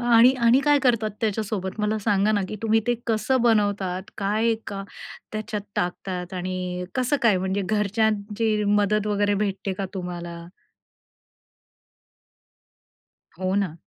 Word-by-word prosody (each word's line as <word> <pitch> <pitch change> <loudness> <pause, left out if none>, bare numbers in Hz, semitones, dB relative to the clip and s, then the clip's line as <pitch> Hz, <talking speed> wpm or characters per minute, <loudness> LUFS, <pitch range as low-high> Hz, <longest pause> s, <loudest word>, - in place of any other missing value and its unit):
आणि 240 +1 +6
आणि 235 +3 +5
काय 290 0 +4
करतात 230 -4 +2
त्याच्यासोबत 210 -2 -2
मला 210 +1 0
सांगा 205 0 +2
ना 205 - +2
की 215 - -5
तुम्ही 225 0 +3
ते 240 - +3
कसं 235 +3 +1
बनवतात 205 -5 +1
काय 215 +3 +1
का 195 -1 -5 0.5
त्याच्यात 215 -1 -3 0.2
टाकतात 180 0 -3
आणि 180 0 -3
कसं 255 +2 +1
काय 225 -5 +5
म्हणजे 190 +2 -1
घरच्यांची 210 +1 0
मदत 205 0 +2
वगैरे 205 0 +1
भेटते 195 0 -3
का 195 +1 -3
तुम्हाला? 175 -2 -5 3.0
हो 185 0 -1
ना. 195 -5 0
205 Hz, 125 wpm, -24 LUFS, 190-220 Hz, 3.0 s, आणि